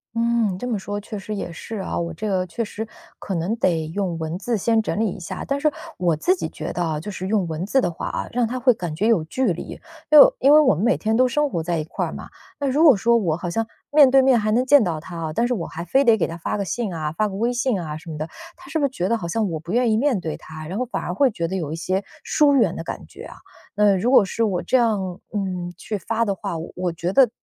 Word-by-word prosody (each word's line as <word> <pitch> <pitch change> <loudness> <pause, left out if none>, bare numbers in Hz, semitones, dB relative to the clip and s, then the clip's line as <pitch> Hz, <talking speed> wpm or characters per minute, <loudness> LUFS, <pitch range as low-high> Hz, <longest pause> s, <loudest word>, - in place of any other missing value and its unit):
嗯， 230 -4 +1
这 245 - -5
么 225 -4 -1
说 205 +1 -4
确 210 0 -7
实 210 +2 -5
也 195 -3 -5
是 220 +7 -7
啊， 190 - -3
我 170 0 -3
这 215 +7 -5
个 185 -2 0
确 180 +7 -3
实， 220 +1 -6 0.3
可 195 - -4
能 175 +7 -1
得 165 -7 +1
用 175 0 -2
文 160 +2 -4
字 235 +2 -1
先 225 +3 +2
整 215 - -3
理 220 -1 +2
一 195 - -8
下。 170 - -6
但 280 0 0
是 305 +1 +2 0.3
我 175 -3 +1
自 360 - +2
己 - - -4
觉 - - -6
得 175 - -3
啊， 160 -3 -1
就 205 +7 -6
是 185 -1 -5
用 200 -3 +1
文 160 +2 -3
字 265 +6 +2
的 175 - 0
话 165 - -5
啊， - - -3
让 240 -1 +1
他 250 +3 -3
会 250 0 +4
感 175 -7 -5
觉 200 +7 0
有 220 -9 +3
距 245 +6 0
离， 170 - -8 0.3
因 305 -1 +9
为 - - +9
因 275 +3 +5
为 305 - +9
我 300 - +5
们 170 - -2
每 240 +3 +3
天 220 +1 0
都 255 +2 +4
生 295 +4 +1
活 170 - -2
在 170 +1 -1
一 155 - -1
块 155 - -3
儿 - - -6
嘛， - - -8 0.3
那 285 - -1
如 280 +4 +2
果 295 -7 +8
说 235 +4 +2
我 170 -8 0
好 175 0 -4
像 225 +6 -1 0.2
面 290 -2 +7
对 270 +1 +6
面 260 -3 +4
还 215 0 0
能 245 +4 +2
见 285 -1 +6
到 170 -5 -2
他 170 +2 -9
啊， 160 -2 -4
但 235 +8 +1
是 250 - 0
我 185 -8 -3
还 170 +2 -7
非 270 +10 +3
得 230 -4 +5
给 190 - +1
他 165 - -6
发 170 - -3
个 200 - -2
信 210 +3 -2
啊， 155 -3 -3
发 215 +7 0
个 195 - -6
微 235 +5 0
信 245 -4 0
啊 155 -3 -5
什 160 +2 -12
么 155 - -5
的， 155 +1 -4 0.3
他 355 - -15
是 320 - 0
不 290 - +2
是 - - +1
觉 185 -8 -2
得 230 - +2
好 170 - -5
像 215 +4 0
我 160 - -3
不 165 +3 -8
愿 240 +1 +2
意 215 - +3
面 260 -3 +2
对 160 -3 -4
他， 155 0 -10
然 190 +7 -4
后 255 - 0
反 250 - -4
而 180 - -3
会 270 +8 +3
觉 170 -7 -3
得 190 - -4
有 160 -6 -3
一 - - -3
些 185 +4 -1 0.2
疏 290 -2 +3
远 220 -10 +3
的 165 - -5
感 - - -6
觉 - - -12
啊？ - - -11 0.4
那 205 -1 +4
如 190 +6 0
果 255 -6 +6
是 225 +4 -1
我 190 -5 0
这 260 - +2
样， 200 -7 0
嗯， 185 -4 -3
去 210 +3 -4
发 230 +4 -1
的 200 - 0
话， 175 -3 -5 0.2
我 180 -1 -1
觉 170 +2 -3
得， 265 -1 +6
205 Hz, 320 characters per minute, -22 LUFS, 170-235 Hz, 0.4 s, 因